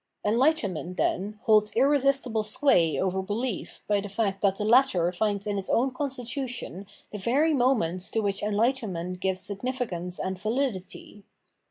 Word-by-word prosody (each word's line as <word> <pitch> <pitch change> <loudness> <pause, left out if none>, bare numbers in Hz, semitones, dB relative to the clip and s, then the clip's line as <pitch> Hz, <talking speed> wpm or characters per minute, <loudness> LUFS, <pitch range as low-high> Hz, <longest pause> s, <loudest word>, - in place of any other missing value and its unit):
Enlightenment, 210 - +1
then, 205 +3 -1
holds 215 -3 +3
irresistible 275 -3 +2
sway 210 - +2
over 190 0 0
behef 210 +3 -4
by 205 -1 +2
the 205 - -7
fact 195 -1 -1
that 195 -2 +3
the 210 - -3
latter 220 -7 +4
finds 200 +1 -1
in 205 -1 -1
its 195 - -6
own 260 +3 +2
constitution 255 - -4 0.2
the 210 - -6
very 280 +10 +2
moments 220 - +1
to 225 - 0
which 200 -2 -1
enlightenment 205 -5 -1
gives 190 0 -1
signifi.cance 200 -5 -4
and 190 0 -3
vahdity. 210 -3 -3
210 Hz, 145 wpm, -27 LUFS, 190-255 Hz, 0.2 s, latter